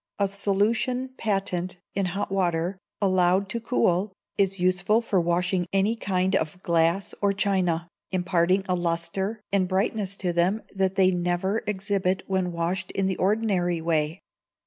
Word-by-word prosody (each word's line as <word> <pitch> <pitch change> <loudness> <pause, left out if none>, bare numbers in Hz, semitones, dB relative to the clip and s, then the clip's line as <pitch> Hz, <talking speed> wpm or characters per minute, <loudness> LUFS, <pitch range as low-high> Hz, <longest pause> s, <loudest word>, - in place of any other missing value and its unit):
A 200 - +2
solution 215 +6 +1
Patent 195 -5 -2 0.2
in 195 -1 0
hot 195 +2 -3
water, 180 -1 0 0.2
allowed 185 0 +2
to 235 - -2
cool, 200 -5 +1 0.2
is 195 -1 +2
useful 185 +4 +3
for 210 -6 +1
washing 175 +1 0
any 195 +4 +2
kind 190 -3 0
of 160 -1 -1
glass 170 +2 +1
or 200 -1 +2
china, 185 -4 +1 0.2
imparting 185 +1 +1
a 185 - +1
lustre 175 +5 -1
and 195 -2 +2
brightness 195 +1 -1
to 180 -2 -1
them 180 +6 +1
that 190 -1 0
they 190 -1 +4
never 180 +4 0
exhibit 195 -2 0
when 190 -2 -1
washed 175 +2 -2
in 195 - 0
the 190 -1 -1
ordinary 190 -4 +1
way. 160 +1 0
190 Hz, 145 wpm, -25 LUFS, 175-200 Hz, 0.2 s, they